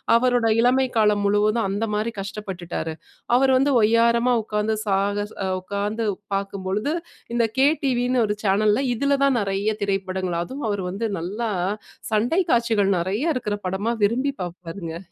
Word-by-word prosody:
அவருடைய 235 -2 +3
இளமை 260 +2 +3
காலம் 210 -2 +3
முழுவதும் 210 +2 +2
அந்த 220 +3 -1
மாரி 220 +2 -1
கஷ்டப்பட்டுட்டாரு. 185 -5 -5 0.4
அவர் 265 0 +4
வந்து 275 +2 +2
ஒய்யாரமா 235 +2 +3
உட்கார்ந்து 215 +1 -1
சாகச 205 +1 0 0.3
உட்கார்ந்து 205 +4 -2 0.3
பார்க்கும் 195 -1 -4
பொழுது, 215 - -1 0.4
இந்த 235 - +3 0.2
கே 275 - +6 0.2
டிவின்னு 250 -1 +2
ஒரு 210 - 0
சேனல்ல 210 +6 +3
இதுல 280 +3 +1
தான் 270 -3 +3
நிறைய 200 +2 -1
திரைப்படங்கள், 190 -3 -1
அதுவும் 260 +4 -6
அவரு 205 -2 -1
வந்து 205 +5 -3
நல்லா, 210 +7 -3 0.6
சண்டை 240 - +2
காட்சிகள் 225 -4 +2
நெறைய 185 +3 -1 0.2
இருக்கிற 210 -5 -2
படமா 190 +5 -1
விரும்பி 255 +7 +2
பார்ப்பாருங்க. 175 0 -7
210 Hz, 140 wpm, -23 LUFS, 195-235 Hz, 0.6 s, கே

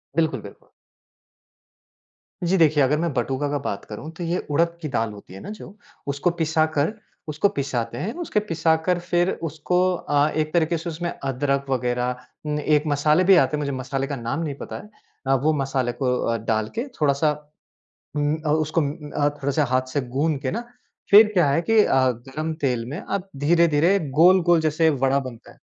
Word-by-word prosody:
बिल्कुल, 155 -7 +1
बिल्कुल। 100 - -14 1.7
जी, 180 +2 +2
देखिए, 155 -4 +4
अगर 140 +3 +2
मैं 170 0 0
बटूका 130 +3 -1
का 145 - 0
बात 100 -7 -4
करूँ 110 +9 -8
तो 175 - -5
ये 170 +1 -1
उड़द 170 +3 +1
की 155 - -3
दाल 115 -4 -1
होती 100 -3 -13
है 95 - -9
ना - - -8
जो, 210 -1 -10 0.3
उसको 140 +5 0
पिसाकर 155 0 0 0.3
उसको 155 +7 +1
पिसाते 120 -6 -3
हैं। 205 - -3
उसके 220 - 0
पिसाकर 165 -2 +1
फिर 175 +1 +1
उसको 160 +3 -1 0.2
अ, 145 -2 +1
एक 155 0 -2
तरीके 170 0 +2
से 170 +2 -5
उसमें 170 +2 -4
अदरक 140 +1 -1
वगैरह 125 -1 0 0.3
उम, 150 0 -1
एक 150 0 +2
मसाले 150 +4 +3
भी 190 +1 +6
आते 155 -3 +3
हैं, - - -4
मुझे 140 -1 -2
मसाले 135 +1 -3
का 145 - -3
नाम 120 +3 -3
नहीं 145 -4 -3
पता - - -8
है। 210 - -15 0.4
अ, 135 - +3
वो 150 +4 +2
मसाले 130 -2 -1
को 125 -1 +2
अ, 115 0 +1
डाल 110 -1 -1
के 235 +5 -2
थोड़ा-सा 150 +1 +3 0.8
उम 145 +1 +1
अ, - - 0
उसको 155 +2 +1
म 140 -2 -1 0.2
अ, 145 0 +1
थोड़ा-सा 140 +2 +1
हाथ 130 0 0
से 145 - +1 0.2
गूँध 150 0 +1
के 130 - -2
ना, 230 +3 -3 0.5
फिर 210 +1 +8
क्या 175 -7 +3
है 140 +4 +2
कि 225 +4 +3
अ, 135 - +2
गरम 135 +7 -5
तेल 125 -4 0
में 150 - -5
अब 195 -1 -4 0.2
धीरे-धीरे 170 +2 +4 0.2
गोल-गोल 175 -1 +5
जैसे 155 +1 +2
वड़ा 135 -1 +2
बनता 130 -4 -9
है। - - -20
150 Hz, 190 wpm, -23 LUFS, 135-170 Hz, 1.7 s, फिर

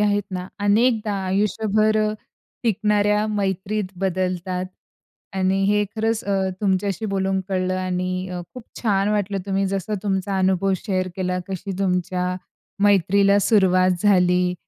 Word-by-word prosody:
आहेत 205 0 +2
ना, 185 -1 -4 0.2
अनेकदा 220 0 +2
आयुष्यभर 215 +2 +1
अ, 215 0 +1 0.5
टिकणाऱ्या 210 -1 +2
मैत्रीत 200 0 -1 0.2
बदलतात. 185 -1 -1 0.7
आणि 190 +1 +1
हे 210 +1 +3
खरंच 225 +1 0
अ, 195 -1 0
तुमच्याशी 200 +2 0
बोलून 195 -1 0
कळलं 185 -1 0
आणि 185 0 -2
अ, 180 -1 -5
खूप 250 - -8 0.2
छान 200 -2 +2
वाटलं 205 -1 0
तुम्ही 195 0 0
जसा 195 +2 -2
तुमचा 195 -1 -1
अनुभव 190 +1 +2
शेअर 185 -2 0
केला. 180 -1 -1
कशी 195 +1 -4
तुमच्या 180 -1 0 0.5
मैत्रीला 200 +1 +4
सुरुवात 185 -3 +4
झाली. 180 -3 +3
195 Hz, 125 wpm, -22 LUFS, 185-210 Hz, 0.7 s, मैत्रीला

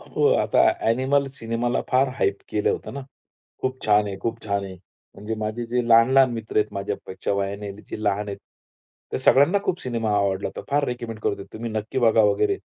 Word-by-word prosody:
हो - - 0 0.2
आता - - +2 0.3
अ‍ॅनिमल 130 +4 +2
सिनेमाला 115 +2 -1
फार 130 +1 +3
हाईप 100 -3 +1
केलं 105 - +1
होतं - - -4
ना. 140 - -4 0.6
खूप 130 0 -2
छान 105 -1 +4
आहे. 100 -1 -4
खूप 115 0 -3
छान 100 -1 -1
आहे. 95 -1 -8 0.4
म्हणजे 105 +2 -5
माझे 110 +2 -3
जे 125 +1 0
लहान-लहान 125 +3 +6
मित्र 115 -2 -6
आहेत 105 0 +2
माझ्यापेक्षा 100 -1 -4
वयाने 100 +1 -3
जे 105 +1 -9
लहान 105 0 0
आहेत. 100 - -5 0.7
त्या - - -2
सगळ्यांना 145 +9 +5
खूप 180 - -1
सिनेमा 115 -3 -2
आवडला 100 -1 0
होता. - - -7
फार 145 0 +2
रेकमेंड 120 -3 -5
करतो. 100 -1 -2
तुम्ही 115 +1 -5
नक्की 110 +3 -3
बघा 115 -2 +4
वगैरे. 105 - +2
110 Hz, 185 wpm, -24 LUFS, 100-125 Hz, 0.7 s, लहान-लहान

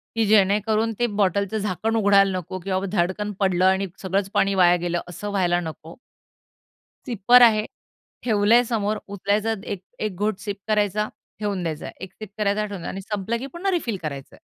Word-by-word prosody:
की 225 -1 +2
जेणेकरून 215 +2 +3
ते 240 - +2
बॉटलचं 200 +2 +1
झाकण 210 +2 -1
उघडायला 200 -2 +4
नको 185 +1 -6
किंवा 190 +1 -2
धडकन 195 +2 0
पडलं 185 -2 +2
आणि 190 +1 +3
सगळंच 195 +1 -1
पाणी 195 0 +2
वाया 175 -2 +5
गेलं, 175 0 -1
असं 205 +4 -6
व्हायला 180 -3 +1
नको. 160 0 -8 1.1
सिपर 240 +1 +5
आहे, 215 -2 +5 0.6
ठेवलंय 225 +1 +4
समोर 215 -3 -1
उचलायचा, 205 +2 0 0.5
1 215 -3 -2
घोट 210 +1 -1
सिप 200 0 -5
करायचा 210 -1 +1 0.3
ठेवून 205 -3 -2
द्यायचाय. 160 -2 -4
1 190 0 -8
सिप 215 -2 -9
करायचा 210 0 +1
ठेवून 200 -3 -7
द्या - - -5
आणि 195 - -6
संपलं 210 +3 -3
की 265 - -5
पुन्हा 385 +3 -1
रिफिल 250 - -1
करायचंय. 140 -3 -6
200 Hz, 165 wpm, -23 LUFS, 185-215 Hz, 1.1 s, वाया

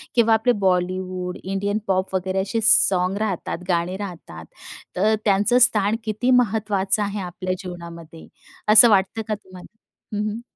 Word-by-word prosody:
किंवा 230 -2 +4
आपले 225 +3 +2
Bollywood, 185 -1 -1
Indian 195 +2 -2
pop 190 0 -1
वगैरे 190 +1 -1
असे 205 +4 -2
सॉन्ग 185 -2 +3
राहतात, 205 -6 -3
गाणे 175 +1 -1
राहतात. 170 - -9 0.5
तर 215 +4 +2
त्यांचं 205 +4 +3
स्थान 210 -3 +3
किती 225 +3 -1
महत्त्वाचं 210 -4 +1
आहे 205 0 -4
आपल्या 185 +1 -4
जीवनामध्ये, 170 -3 -10 0.4
असं 215 +2 +8
वाटतं 205 +2 +1
का 215 - -1
तुम्हाला? 185 +1 -15 0.4
हं, 210 - -1
हं. 220 +2 -6
195 Hz, 140 wpm, -22 LUFS, 185-215 Hz, 0.5 s, असं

